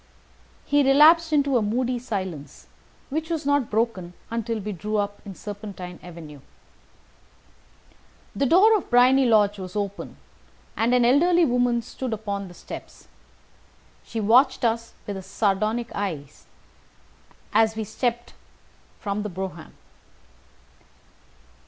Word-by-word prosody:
He 290 Hz, 0 st, +3 dB
relapsed 310 Hz, +4 st, +6 dB
into 285 Hz, -3 st, +2 dB
a -, -, +1 dB
moody 245 Hz, +4 st, -1 dB
silence, 190 Hz, -, -6 dB, 0.5 s
which 315 Hz, +3 st, -3 dB
was 325 Hz, -4 st, -2 dB
not 285 Hz, -4 st, +1 dB
broken 210 Hz, -6 st, -2 dB, 0.2 s
until 230 Hz, 0 st, -2 dB
we 210 Hz, +1 st, -5 dB
drew 210 Hz, +3 st, -3 dB
up 205 Hz, 0 st, -2 dB
in 195 Hz, -2 st, -8 dB
Serpentine 200 Hz, -4 st, -8 dB
Avenue. 165 Hz, -4 st, -11 dB, 2.0 s
The 275 Hz, -, +1 dB
door 405 Hz, -, +6 dB
of 400 Hz, -, -3 dB
Briony 255 Hz, +2 st, +5 dB
Lodge 205 Hz, -3 st, +3 dB
was 185 Hz, 0 st, -8 dB
open, 200 Hz, -1 st, -4 dB, 0.6 s
and 235 Hz, +2 st, +2 dB
an 245 Hz, -1 st, +4 dB
elderly 340 Hz, +7 st, +4 dB
woman 245 Hz, -2 st, +1 dB
stood 255 Hz, +1 st, -5 dB
upon 200 Hz, -2 st, -4 dB
the 175 Hz, -, -13 dB
steps. -, -, -11 dB, 0.9 s
She 230 Hz, -, -5 dB
watched 245 Hz, +5 st, +4 dB
us 230 Hz, 0 st, -1 dB
with 200 Hz, -1 st, -5 dB
a -, -, -6 dB
sardonic 215 Hz, +4 st, -1 dB
eye 175 Hz, -8 st, -3 dB, 1.3 s
as 220 Hz, +1 st, +3 dB
we 220 Hz, -, -3 dB
stepped 240 Hz, +2 st, -3 dB, 0.7 s
from 200 Hz, 0 st, -3 dB
the 210 Hz, -, -4 dB
brougham. 185 Hz, -3 st, -7 dB
225 Hz, 125 wpm, -24 LUFS, 200-255 Hz, 2.0 s, relapsed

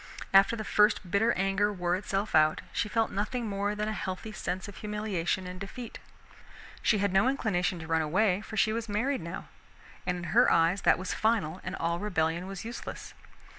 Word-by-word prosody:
After 195 Hz, +4 st, +6 dB
the 220 Hz, -, -4 dB
first 210 Hz, -4 st, +2 dB
bitter 220 Hz, +4 st, +3 dB
anger 195 Hz, +2 st, +1 dB
wore 180 Hz, -3 st, 0 dB
itself 195 Hz, +2 st, -2 dB
out, 155 Hz, 0 st, +4 dB
she 210 Hz, -, -1 dB
felt 225 Hz, 0 st, +1 dB
nothing 230 Hz, +4 st, -2 dB
more 205 Hz, 0 st, -1 dB
than 210 Hz, 0 st, -2 dB
a 215 Hz, -, -1 dB
healthy 190 Hz, +2 st, -5 dB
sense 185 Hz, -2 st, -4 dB
of 205 Hz, -, -10 dB
humiliation 210 Hz, -4 st, -2 dB
and 180 Hz, 0 st, -7 dB
defeat. 225 Hz, +4 st, -7 dB, 0.8 s
She 215 Hz, -, +3 dB
had 200 Hz, -1 st, 0 dB
no 195 Hz, +6 st, +4 dB
inclination 200 Hz, -9 st, 0 dB
to 160 Hz, -, -7 dB
run 160 Hz, 0 st, +1 dB
away, 185 Hz, +5 st, +2 dB
for 220 Hz, +1 st, -8 dB
she 215 Hz, +1 st, +3 dB
was 230 Hz, 0 st, -3 dB
married 240 Hz, +4 st, 0 dB
now, 170 Hz, +3 st, -7 dB, 0.6 s
and 180 Hz, 0 st, 0 dB
in 175 Hz, -, -6 dB
her 245 Hz, +3 st, +6 dB
eyes 170 Hz, +4 st, +3 dB
that -, -, +4 dB
was 185 Hz, +1 st, -3 dB
final 205 Hz, -7 st, 0 dB
and 185 Hz, -, -4 dB
all 170 Hz, +1 st, -1 dB
rebellion 175 Hz, -3 st, -1 dB
was 195 Hz, +1 st, -7 dB
useless. 235 Hz, +2 st, -7 dB
195 Hz, 195 wpm, -29 LUFS, 180-215 Hz, 0.8 s, After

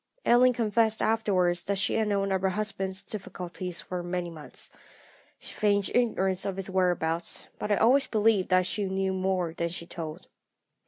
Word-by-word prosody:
"Ellen 250 Hz, +1 st, +6 dB
confessed 220 Hz, -1 st, +1 dB
afterwards 190 Hz, -6 st, +2 dB
that 200 Hz, 0 st, -2 dB
she 195 Hz, -, +1 dB
had 220 Hz, -1 st, +1 dB
known 200 Hz, -1 st, 0 dB
of 190 Hz, -1 st, +1 dB
her 190 Hz, -, +2 dB
husband's 195 Hz, -1 st, -2 dB
difficulties 180 Hz, -3 st, -4 dB
for 180 Hz, -1 st, -5 dB
many 175 Hz, 0 st, -3 dB
months. 155 Hz, -3 st, -8 dB, 0.7 s
She -, -, -6 dB
feigned 205 Hz, -2 st, +1 dB
ignorance 195 Hz, -6 st, +1 dB
of 195 Hz, -, -2 dB
his 195 Hz, 0 st, -5 dB
whereabouts, 175 Hz, -3 st, 0 dB
but 210 Hz, -, -3 dB
I -, -, +5 dB
always 255 Hz, +7 st, +4 dB
believed 215 Hz, -3 st, +2 dB
that 185 Hz, -1 st, +4 dB
she 205 Hz, +2 st, -1 dB
knew 190 Hz, 0 st, -1 dB
more 185 Hz, -3 st, -1 dB
than 170 Hz, 0 st, -2 dB
she 170 Hz, 0 st, -6 dB
told. 165 Hz, -1 st, -7 dB
190 Hz, 170 wpm, -28 LUFS, 180-210 Hz, 0.7 s, Ellen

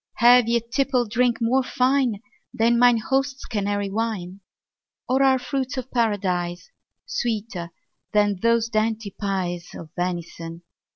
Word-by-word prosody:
Have 245 Hz, 0 st, +6 dB
ye 235 Hz, 0 st, +3 dB
tippled 250 Hz, -1 st, 0 dB
drink 245 Hz, 0 st, +2 dB
more 245 Hz, +3 st, +2 dB
fine 255 Hz, -4 st, +1 dB, 0.3 s
Than 235 Hz, +1 st, +2 dB
mine 245 Hz, -1 st, +6 dB
host's 270 Hz, +4 st, -1 dB
Canary 205 Hz, -2 st, -2 dB
wine? 200 Hz, -4 st, -3 dB, 0.7 s
Or 260 Hz, +2 st, +2 dB
are 265 Hz, -1 st, +5 dB
fruits 260 Hz, +1 st, -3 dB
of 255 Hz, 0 st, -5 dB
Paradise 190 Hz, -, -1 dB, 0.3 s
Sweeter 210 Hz, -7 st, -3 dB, 0.4 s
than 205 Hz, -2 st, +2 dB
those 230 Hz, 0 st, +3 dB
dainty 220 Hz, -2 st, -1 dB
pies 180 Hz, -4 st, -3 dB
Of 160 Hz, -2 st, -10 dB
venison? 170 Hz, -1 st, -4 dB
225 Hz, 125 wpm, -23 LUFS, 195-250 Hz, 0.7 s, Have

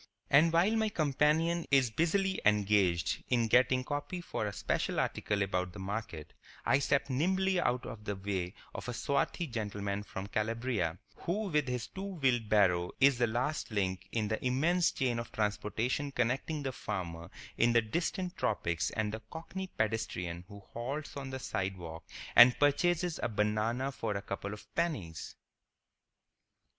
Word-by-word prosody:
And 155 Hz, +4 st, +6 dB
while 180 Hz, +7 st, +3 dB
my 220 Hz, -1 st, +2 dB
companion 160 Hz, +1 st, +2 dB
is 135 Hz, -4 st, +4 dB
busily 190 Hz, -, +1 dB
engaged 100 Hz, -7 st, +2 dB
in 120 Hz, -2 st, +2 dB
getting 130 Hz, +2 st, +4 dB
copy 145 Hz, +6 st, -3 dB
for 140 Hz, -10 st, -3 dB
a -, -, -2 dB
special -, -, -1 dB
article 100 Hz, -1 st, 0 dB
about 90 Hz, -2 st, -2 dB
the 105 Hz, -, -8 dB
Market, 95 Hz, -5 st, -5 dB, 0.3 s
I 135 Hz, -, +4 dB
step 140 Hz, 0 st, +1 dB
nimbly 185 Hz, +7 st, +1 dB
out 125 Hz, -6 st, 0 dB
of 115 Hz, -4 st, -8 dB
the 105 Hz, -, -2 dB
way 95 Hz, -2 st, -3 dB, 0.2 s
of -, -, -6 dB
a -, -, -2 dB
swarthy 140 Hz, +6 st, 0 dB
gentleman 105 Hz, -5 st, -3 dB
from 95 Hz, -1 st, -6 dB
Calabria, 110 Hz, -5 st, -1 dB, 0.2 s
who 200 Hz, +4 st, -2 dB
with 150 Hz, -4 st, +1 dB
his 125 Hz, -1 st, -2 dB
two 195 Hz, 0 st, -6 dB
wheeled 125 Hz, -8 st, +1 dB
barrow 90 Hz, -4 st, +3 dB
is 140 Hz, -2 st, +5 dB
the 120 Hz, -, +3 dB
last 125 Hz, +7 st, -1 dB
link 95 Hz, -3 st, -2 dB
in 110 Hz, -2 st, 0 dB
the 110 Hz, +1 st, -2 dB
immense 160 Hz, +8 st, +3 dB
chain 125 Hz, -3 st, 0 dB
of 115 Hz, -, -6 dB
transportation 110 Hz, +6 st, -1 dB
connecting 135 Hz, +5 st, -1 dB
the 135 Hz, -, -1 dB
farmer 90 Hz, -7 st, -5 dB, 0.3 s
in 120 Hz, 0 st, +3 dB
the 115 Hz, -, +5 dB
distant 175 Hz, -, -2 dB
tropics 85 Hz, -5 st, 0 dB
and 110 Hz, -1 st, -2 dB
the 110 Hz, -, -5 dB
cockney 190 Hz, +4 st, -6 dB
pedestrian 90 Hz, -, -2 dB
who 100 Hz, 0 st, -11 dB
halts 135 Hz, +6 st, -4 dB
on 135 Hz, -1 st, -5 dB
the 130 Hz, -, -4 dB
sidewalk 95 Hz, -8 st, -4 dB, 0.3 s
and 120 Hz, +1 st, +9 dB
purchases 175 Hz, +4 st, +2 dB
a -, -, 0 dB
banana 110 Hz, +5 st, 0 dB
for 110 Hz, -5 st, -3 dB
a -, -, -4 dB
couple 100 Hz, 0 st, -4 dB
of 105 Hz, -, -8 dB
pennies. 135 Hz, -, -2 dB
120 Hz, 160 wpm, -32 LUFS, 105-145 Hz, 0.3 s, and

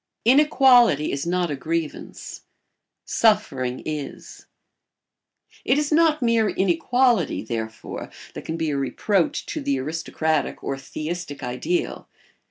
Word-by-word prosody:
[Sidenote: 255 Hz, +5 st, +6 dB
Inequality 245 Hz, -, +5 dB
is 140 Hz, +4 st, -3 dB
not 175 Hz, -2 st, 0 dB
a -, -, -1 dB
grievance; 160 Hz, +2 st, -5 dB, 0.6 s
suffering 135 Hz, -, +1 dB
is.] 150 Hz, -2 st, -6 dB, 1.2 s
It 255 Hz, -, +2 dB
is 295 Hz, 0 st, 0 dB
not 310 Hz, -2 st, +3 dB
mere 230 Hz, -2 st, +3 dB
inequality, 195 Hz, -, +1 dB
therefore, 110 Hz, -1 st, -5 dB, 0.2 s
that -, -, -7 dB
can 160 Hz, -, -4 dB
be 160 Hz, -2 st, -1 dB
a 140 Hz, -, -1 dB
reproach 170 Hz, +7 st, 0 dB
to -, -, -4 dB
the 140 Hz, -1 st, 0 dB
aristocratic 160 Hz, +1 st, -2 dB
or 135 Hz, -, -2 dB
theistic 155 Hz, +2 st, -6 dB
ideal. 335 Hz, -, -2 dB
165 Hz, 120 wpm, -23 LUFS, 140-235 Hz, 1.2 s, Sidenote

